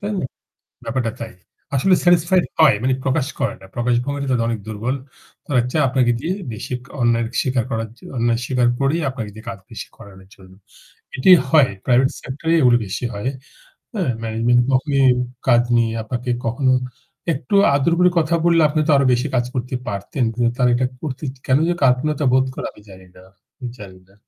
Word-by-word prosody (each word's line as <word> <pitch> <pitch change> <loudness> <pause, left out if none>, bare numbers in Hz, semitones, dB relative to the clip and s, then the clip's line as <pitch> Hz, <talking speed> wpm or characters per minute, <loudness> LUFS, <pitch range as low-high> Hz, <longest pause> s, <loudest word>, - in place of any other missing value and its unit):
তাই 205 +1 -3
না? - - -3 0.6
ব্যাপারটা 115 -1 -2
তাই। 115 -1 -7 0.4
আসলে 185 +8 +3
স্যাটিসফাইড 175 +1 +4 0.2
হয় 155 -6 +6
মানে 130 +1 +2
প্রকাশ 135 0 +1
করে - - 0
না। - - -12
প্রকাশ 120 0 +1
ভঙ্গি 140 0 -3
টা 140 - -4
তাদের 115 -2 +1
অনেক 115 -2 -2
দুর্বল। 110 +5 -2 0.5
তারা 130 -6 +2
চায় 155 +1 +2
আপনাকে 125 -2 +2
দিয়ে 170 +8 -2 0.2
বেশি 110 - -6 0.3
অন্যায় 115 -1 +2 0.2
স্বীকার 125 -3 0
করার 115 -1 -2
জন্য - - -13
অন্যায় 115 0 +1
স্বীকার 125 -2 +1
করেই 140 +5 +1
আপনাকে 115 -5 -5
দিয়ে 110 +2 -12
কাজ 100 -3 -7
বেশি 110 - -7
করানোর 95 -1 -14
জন্য। 95 -1 -17 0.6
এটি 130 - +2 0.2
হয় 145 -3 +5 0.2
প্রাইভেট 130 +1 +4
সেক্টরেই 160 +5 -1
এগুলো 120 -2 +5
বেশি 95 +3 -5
হয়। 105 +5 -3 0.6
হ্যাঁ, 190 - -1
ম্যানেজমেন্ট 115 +2 +2
কখনই 135 +1 +2 0.4
কাজ 120 -1 +5
নিয়ে 115 -1 +2
আপনাকে 125 +3 -4 0.2
কখনো 130 +3 +1 0.6
একটু 135 +5 -4 0.2
আদর 140 +4 +2
করে 180 0 +5
কথা 165 +1 +1
বললে 170 -1 +4
আপনি 155 +1 0
তো - - +2
আরো 140 - +3
বেশি 125 +3 +1
কাজ 120 -1 +2
করতে 125 0 -3
পারতেন। 105 +6 -2
কিন্তু 120 0 +1
তারা 125 -1 +3
এটা 130 +1 +1 0.2
করতে 140 -2 -5 0.2
কেন 130 +1 +4
যেন 175 0 0
কার্পণ্যতা 135 +3 +2
বোধ 130 0 +4
করে - - -4
আমি - - -18
জানি 95 -1 -13
না 90 - -15 0.3
আমি 125 - -6
জানি 95 -3 -11
না। 95 - -24
125 Hz, 190 wpm, -20 LUFS, 115-140 Hz, 0.6 s, হয়